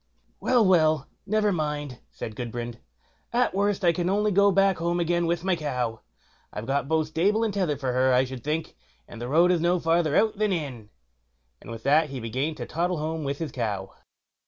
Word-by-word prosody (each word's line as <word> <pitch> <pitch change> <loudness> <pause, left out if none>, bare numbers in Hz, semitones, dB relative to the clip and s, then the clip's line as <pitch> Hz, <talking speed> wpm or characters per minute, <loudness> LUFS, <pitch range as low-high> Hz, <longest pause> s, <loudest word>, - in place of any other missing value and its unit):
"Well! 245 -4 +3
well! 155 -6 +3 0.2
never 210 0 +2
mind", 150 -6 -3
said 110 - -7
Gudbrand, 120 0 -5 0.5
"at 245 +1 +2
the - - -5
worst, 200 -1 +1
I 170 - +6
can 175 +1 -1
only 210 +2 +2
go 200 +1 +5
back 195 -1 +3
home 170 +1 0
again 170 0 +1
with 170 0 -1
my 190 -1 +2
cow. 125 -8 -3 0.5
I've 105 - -6 0.2
both 160 0 +1
stable 200 +8 +1
and 220 -3 -1
tether 180 -8 0
for 130 -2 -2
her, 130 +1 +3
I 125 +1 +4
should 130 -2 -7
think, 155 +2 -3 0.3
and 115 - -10
the 120 - -4
road 170 +5 +4
is 175 -3 +1
no 175 +1 +2
farther 165 -2 +1
out 220 -2 +2
than 215 -1 +2
in"; 135 - -4 0.7
and - - -12
with 115 -1 -7
that 150 +2 +3
he 135 -1 -5
began 130 +7 -2
to - - -6
toddle 175 +2 -1
home 155 +1 -3
with 140 0 -2
his 160 -3 -4
cow. 100 -6 -3
160 Hz, 205 wpm, -26 LUFS, 130-180 Hz, 0.7 s, I